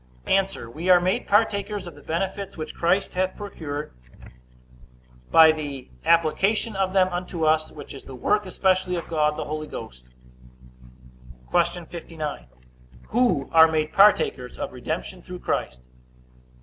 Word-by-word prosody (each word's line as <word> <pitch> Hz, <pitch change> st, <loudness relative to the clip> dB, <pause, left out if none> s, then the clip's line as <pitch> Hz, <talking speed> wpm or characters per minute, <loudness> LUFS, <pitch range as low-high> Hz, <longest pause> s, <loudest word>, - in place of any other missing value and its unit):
A. 195 Hz, 0 st, +3 dB, 0.2 s
We 155 Hz, +10 st, -5 dB
are 180 Hz, -1 st, +8 dB
made 185 Hz, +2 st, -1 dB
partakers 205 Hz, -1 st, +1 dB
of 175 Hz, -, -8 dB
the 145 Hz, -, -15 dB
benefits 190 Hz, +6 st, -3 dB
which 155 Hz, -, -5 dB
Christ 180 Hz, +4 st, +1 dB
hath 185 Hz, 0 st, -1 dB
procured, 155 Hz, -7 st, -6 dB, 1.4 s
by 160 Hz, -1 st, +8 dB
the 145 Hz, -4 st, -6 dB, 0.2 s
application 190 Hz, +7 st, +2 dB
of 190 Hz, -1 st, 0 dB
them 190 Hz, -1 st, +4 dB
unto 175 Hz, -2 st, -3 dB
us, 155 Hz, 0 st, +2 dB
which 150 Hz, -, -10 dB
is 135 Hz, -, -11 dB
the 135 Hz, -, -9 dB
work 210 Hz, +10 st, 0 dB
especially 185 Hz, -1 st, +1 dB
of 170 Hz, -, -5 dB
God 150 Hz, -2 st, +1 dB
the -, -, -3 dB
Holy 155 Hz, 0 st, -4 dB
Ghost. 60 Hz, -, -9 dB, 1.5 s
Q. 175 Hz, -1 st, +1 dB
59. 155 Hz, -, -6 dB, 0.6 s
Who 235 Hz, -, +2 dB
are 160 Hz, 0 st, +8 dB
made 155 Hz, -1 st, -1 dB
partakers 195 Hz, -11 st, +3 dB
of -, -, -5 dB
redemption 160 Hz, +8 st, -5 dB
through 180 Hz, 0 st, -9 dB
Christ? 60 Hz, -, -2 dB
170 Hz, 140 wpm, -24 LUFS, 155-190 Hz, 1.5 s, are